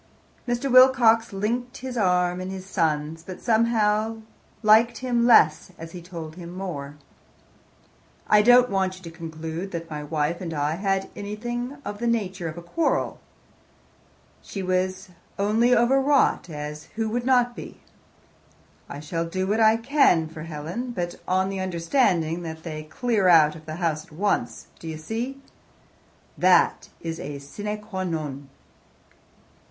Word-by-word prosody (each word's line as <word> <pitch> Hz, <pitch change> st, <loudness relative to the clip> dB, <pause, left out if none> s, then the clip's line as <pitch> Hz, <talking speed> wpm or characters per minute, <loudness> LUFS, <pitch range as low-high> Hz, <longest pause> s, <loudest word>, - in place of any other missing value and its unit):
Mr. 245 Hz, +2 st, -1 dB
Wilcox 245 Hz, -3 st, +6 dB
linked 240 Hz, +6 st, -2 dB
his 255 Hz, 0 st, -6 dB
arm 180 Hz, -4 st, +1 dB
in 185 Hz, -, -5 dB
his 190 Hz, -1 st, -7 dB
son's, 160 Hz, -3 st, -1 dB
but 185 Hz, +2 st, -9 dB
somehow 220 Hz, -1 st, +2 dB, 0.5 s
liked 220 Hz, +2 st, +5 dB
him 245 Hz, -2 st, +1 dB
less 185 Hz, -7 st, +5 dB
as 165 Hz, 0 st, -9 dB
he 180 Hz, -, -8 dB
told 165 Hz, -2 st, -8 dB
him 170 Hz, -2 st, -8 dB
more. 160 Hz, -6 st, -6 dB, 1.3 s
"I 210 Hz, -, +6 dB
don't 245 Hz, +2 st, +6 dB
want 190 Hz, -1 st, 0 dB
you 185 Hz, -, -16 dB
to 165 Hz, -, -8 dB
conclude 160 Hz, +2 st, -6 dB
that 165 Hz, -2 st, -6 dB
my 150 Hz, -1 st, -4 dB
wife 150 Hz, +3 st, -1 dB
and 165 Hz, -3 st, -4 dB
I 150 Hz, +2 st, -1 dB
had 195 Hz, 0 st, -1 dB
anything 240 Hz, +6 st, -5 dB
of 205 Hz, 0 st, -5 dB
the 235 Hz, -, -1 dB
nature 195 Hz, -6 st, -1 dB
of 160 Hz, -, -9 dB
a 175 Hz, -, -8 dB
quarrel. 315 Hz, -, -1 dB, 1.2 s
She 195 Hz, -, -6 dB
was 185 Hz, +1 st, -1 dB, 0.3 s
only 220 Hz, +5 st, +3 dB
over 245 Hz, +3 st, +3 dB
wrought, 275 Hz, -8 st, +2 dB
as 150 Hz, 0 st, -6 dB
who 225 Hz, 0 st, -1 dB
would 240 Hz, +2 st, -2 dB
not 245 Hz, -2 st, +3 dB
be? -, -, -9 dB, 1.1 s
I 145 Hz, -, -7 dB
shall 165 Hz, +3 st, -3 dB
do 185 Hz, +3 st, -2 dB
what 210 Hz, +3 st, 0 dB
I 220 Hz, 0 st, +5 dB
can 230 Hz, -, +3 dB
for 155 Hz, 0 st, -10 dB
Helen, 165 Hz, +10 st, -5 dB
but 175 Hz, -4 st, -4 dB
on 190 Hz, +1 st, +1 dB
the 195 Hz, -1 st, -4 dB
understanding 175 Hz, -, +1 dB
that 160 Hz, -1 st, -7 dB
they 155 Hz, -2 st, -6 dB
clear 210 Hz, +4 st, 0 dB
out 155 Hz, -3 st, +6 dB
of 155 Hz, 0 st, -13 dB
the 155 Hz, -, -5 dB
house 160 Hz, -3 st, -1 dB
at -, -, -24 dB
once. 150 Hz, -, -1 dB
Do 165 Hz, -, -9 dB
you 160 Hz, -1 st, -5 dB
see? 230 Hz, -, -4 dB, 1.0 s
That -, -, +3 dB
is 165 Hz, -1 st, -5 dB
a 145 Hz, 0 st, -6 dB
sine 205 Hz, +10 st, -6 dB
qua 190 Hz, -3 st, -4 dB
non." 150 Hz, -5 st, -4 dB
185 Hz, 155 wpm, -24 LUFS, 160-225 Hz, 1.3 s, Wilcox